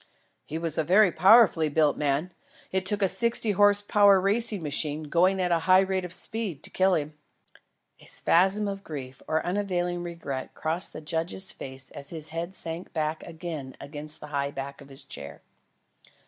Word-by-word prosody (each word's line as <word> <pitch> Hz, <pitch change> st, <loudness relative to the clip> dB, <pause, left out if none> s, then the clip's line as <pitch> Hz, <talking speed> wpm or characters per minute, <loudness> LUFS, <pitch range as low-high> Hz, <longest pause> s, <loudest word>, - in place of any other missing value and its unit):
"He 155 Hz, -, -4 dB
was 165 Hz, -2 st, -2 dB
a -, -, +2 dB
very 190 Hz, +4 st, +5 dB
powerfully 185 Hz, -3 st, +5 dB
built 150 Hz, -1 st, +2 dB
man. 150 Hz, +4 st, -1 dB, 0.4 s
It 190 Hz, 0 st, -1 dB
took 205 Hz, +1 st, +2 dB
a -, -, +4 dB
sixty 225 Hz, +3 st, +3 dB
horse 205 Hz, +1 st, +4 dB
power 205 Hz, -1 st, +5 dB
racing 205 Hz, 0 st, +2 dB
machine, 150 Hz, +1 st, -1 dB
going 180 Hz, +5 st, +2 dB
at 180 Hz, -1 st, 0 dB
a 170 Hz, -, +3 dB
high 185 Hz, +1 st, +7 dB
rate 190 Hz, -1 st, -1 dB
of 180 Hz, -, -8 dB
speed, 185 Hz, -5 st, -2 dB
to -, -, -5 dB
kill 190 Hz, 0 st, +3 dB
him." 150 Hz, 0 st, -3 dB, 0.9 s
A -, -, -17 dB
spasm 195 Hz, +4 st, +2 dB
of 195 Hz, 0 st, -5 dB
grief 135 Hz, -6 st, -8 dB
or 160 Hz, 0 st, 0 dB
unavailing 175 Hz, -2 st, -1 dB
regret 170 Hz, -6 st, -6 dB
crossed 165 Hz, +3 st, -1 dB
the -, -, -7 dB
judge's 165 Hz, +4 st, -3 dB
face 130 Hz, 0 st, -9 dB
as 140 Hz, -, -8 dB
his 155 Hz, -2 st, -6 dB
head 170 Hz, +3 st, -5 dB
sank 165 Hz, +1 st, -6 dB
back 155 Hz, 0 st, -2 dB
again 160 Hz, -5 st, -7 dB
against 150 Hz, +1 st, -6 dB
the 150 Hz, -, -9 dB
high 140 Hz, 0 st, 0 dB
back 140 Hz, 0 st, -7 dB
of 140 Hz, -, -14 dB
his 135 Hz, 0 st, -7 dB
chair. 70 Hz, -, -10 dB
170 Hz, 180 wpm, -27 LUFS, 150-190 Hz, 0.9 s, high